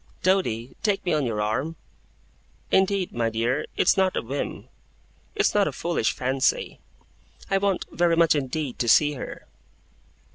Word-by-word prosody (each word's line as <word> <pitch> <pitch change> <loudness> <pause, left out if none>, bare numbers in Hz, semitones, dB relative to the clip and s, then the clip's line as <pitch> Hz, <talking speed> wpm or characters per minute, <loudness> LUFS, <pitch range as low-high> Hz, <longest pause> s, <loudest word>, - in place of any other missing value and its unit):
Doady, 135 - 0
take 205 -3 0
me 175 - +1
on 150 -4 +1
your 105 -2 -1
arm. 130 +10 -2 1.0
Indeed, 190 -1 +2
my 115 -1 0
dear, 120 +6 -1
it's - - +4
not 190 -1 +2
a - - -1
whim. 135 +5 -5 0.7
It's - - +2
not - - +3
a - - -1
foolish - - -1
fancy. 130 +1 0 0.7
I 195 - +3
want, 195 -2 0
very 170 -1 +2
much 165 -1 +4
indeed, 145 -1 -3
to 120 - 0
see 150 +5 +5
her! 130 - -8
150 Hz, 150 wpm, -25 LUFS, 125-185 Hz, 1.0 s, see